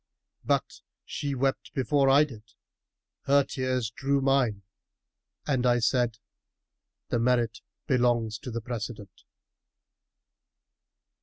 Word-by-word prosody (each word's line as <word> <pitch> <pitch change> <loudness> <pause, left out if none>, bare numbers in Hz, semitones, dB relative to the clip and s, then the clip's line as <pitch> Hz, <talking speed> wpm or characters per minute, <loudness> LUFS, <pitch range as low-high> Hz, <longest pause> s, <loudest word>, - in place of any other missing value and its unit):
But - - -1 0.2
she 145 -2 -3
wept 135 +1 -1
before 135 +1 +2
I 140 +3 +7
did: 125 -8 -7 0.8
her 140 +1 +5
tears 130 -4 -2
drew 140 +4 0
mine; 135 -7 +1 0.8
and 135 -4 0
I 120 -1 +4
said, 120 -1 +1 0.4
* - - -59
The 120 - +2
merit 120 -1 +1 0.2
belongs 120 -4 +1
to - - -7
the 115 0 -4
precedent. 110 -4 -7
125 Hz, 105 wpm, -28 LUFS, 115-135 Hz, 0.8 s, I